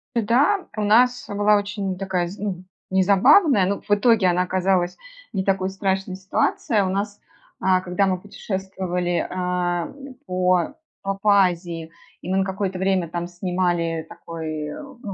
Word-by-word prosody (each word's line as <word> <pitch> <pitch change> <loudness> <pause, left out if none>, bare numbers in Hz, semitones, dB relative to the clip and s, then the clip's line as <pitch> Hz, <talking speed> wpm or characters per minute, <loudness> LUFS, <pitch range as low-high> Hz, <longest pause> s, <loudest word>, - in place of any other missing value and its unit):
Да, 270 - +2
у - - 0
нас 245 +4 +4
была 205 +1 +3
очень 200 -2 -3
такая, 185 -2 -1
з 190 +3 -9
ну 190 -3 -4 0.3
не 190 0 +3
забавная, 225 - +5
но 200 +1 -1
в - - -11
итоге 205 -1 +4
она 180 +1 +2
оказалась 185 -1 0 0.4
не 190 -1 -1
такой 190 -1 +1
страшной, 195 -1 -2
ситуация. 195 +2 0
У 185 - -1
нас, 200 +2 -3 0.4
а, 185 -1 +3
когда 185 +2 0
мы 185 -1 0
путешествовали, 185 -3 -3
а, 180 -1 -1 0.3
по 180 +3 +1 0.3
по 195 - -1
по 200 -2 +5
Азии, 170 -2 -4 0.3
и - - -7
мы 190 - +1
на 190 - +3
какое-то 190 -1 -3
время 190 -3 +1
там 175 0 -3
снимали, 175 -2 -1
такой, 155 -2 -6
ну 275 -4 -10
190 Hz, 155 wpm, -23 LUFS, 180-205 Hz, 0.4 s, забавная